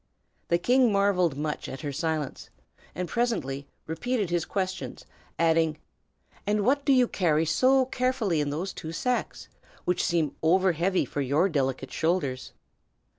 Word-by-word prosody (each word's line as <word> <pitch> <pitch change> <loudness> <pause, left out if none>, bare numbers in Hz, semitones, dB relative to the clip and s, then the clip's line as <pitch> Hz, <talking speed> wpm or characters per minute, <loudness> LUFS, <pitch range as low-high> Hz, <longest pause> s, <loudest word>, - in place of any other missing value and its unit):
The 170 - +3
king 245 +5 +3
marvelled 190 -7 +2
much 150 0 -3
at 135 - -7
her 145 -2 -3
silence, 155 0 -3 0.5
and 180 +1 -3
presently 150 - -1 0.2
repeated 210 +3 -2
his 175 -1 0
questions, 190 -2 -4 0.3
adding, 165 -2 +2 0.7
"And 205 -1 +1
what 280 +2 +2
do 280 - +4
you 255 -2 +5
carry 165 -6 +1
so 255 - +4
carefully 250 - 0
in 145 - -1
those 170 +7 -3
two 160 +1 -7
sacks, 250 +8 -2 0.4
which 180 - +1
seem 165 -4 0
over 185 +3 +4
heavy 180 +3 +1
for 145 - -3
your 140 +7 +2
delicate 135 -4 -1
shoulders?" 160 -6 -1
175 Hz, 145 wpm, -27 LUFS, 155-210 Hz, 0.7 s, you